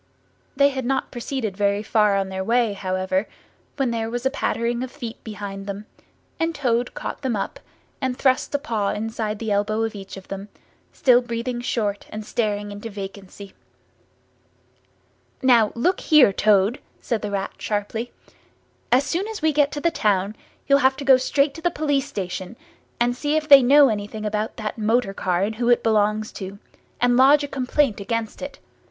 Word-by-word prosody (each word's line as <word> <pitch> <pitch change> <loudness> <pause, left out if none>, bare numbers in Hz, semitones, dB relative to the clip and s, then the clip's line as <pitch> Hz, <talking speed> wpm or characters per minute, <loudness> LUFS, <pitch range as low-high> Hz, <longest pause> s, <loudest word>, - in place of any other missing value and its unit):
They 280 +1 +5
had 265 -2 -4
not 265 +2 -1
proceeded 240 -4 -4
very 200 +1 +1
far 210 -2 +3
on 195 -1 -1
their 190 0 -3
way, 230 0 +2
however, 185 0 -1 0.5
when 270 -4 0
there 225 -1 -2
was 245 +2 -4
a 265 - +2
pattering 235 -3 -1
of 255 - -4
feet 240 -5 -8
behind 200 -2 -7
them, 200 +1 -5 0.5
and 330 0 0
Toad 245 -4 0
caught - - -5
them 260 -5 -1
up 195 - -4 0.4
and 260 -2 -1
thrust 260 +1 +1
a - - +4
paw 225 -9 -2
inside 220 0 -3
the 220 0 -3
elbow 210 +2 +1
of 225 - -2
each 195 -1 -9
of 190 - -12
them; 195 +1 -6 0.4
still 250 -2 +4
breathing 240 0 -4
short 210 -4 -2
and 215 0 -7
staring 205 -2 -2
into 205 +3 -7
vacancy. 200 -1 -9 1.9
"Now, 235 -5 +5
look 355 +11 +1
here, 300 - +5
Toad!" 210 +3 +3 0.2
said 230 -3 -2
the 210 - -3
Rat 195 -1 -3
sharply: 220 +3 -3 0.8
"as 255 +3 +5
soon 345 +8 -2
as 440 -6 -7
we 315 -1 +3
get 290 0 +3
to 290 - -3
the 335 - +2
town, 205 - 0 0.3
you'll 280 0 +4
have 265 -1 +3
to 280 - -6
go 265 -1 +7
straight 275 +2 +1
to 325 - -10
the 350 - +2
police 290 -4 0
station, 185 +1 -5 0.4
and 240 +1 +2
see 295 +4 -1
if 310 -1 0
they 280 -2 +10
know 280 +3 +7
anything 215 0 -4
about 210 +1 -2
that 215 0 -4
motor 220 -1 +1
car 180 -1 0
and 215 +2 -2
who 240 0 0
it 240 - +4
belongs 215 -1 +1
to, 195 0 -7 0.4
and 245 0 +3
lodge 280 +3 +6
a - - -2
complaint 265 -3 0
against 220 +2 -3
it. 280 0 -6
230 Hz, 185 wpm, -23 LUFS, 205-265 Hz, 1.9 s, they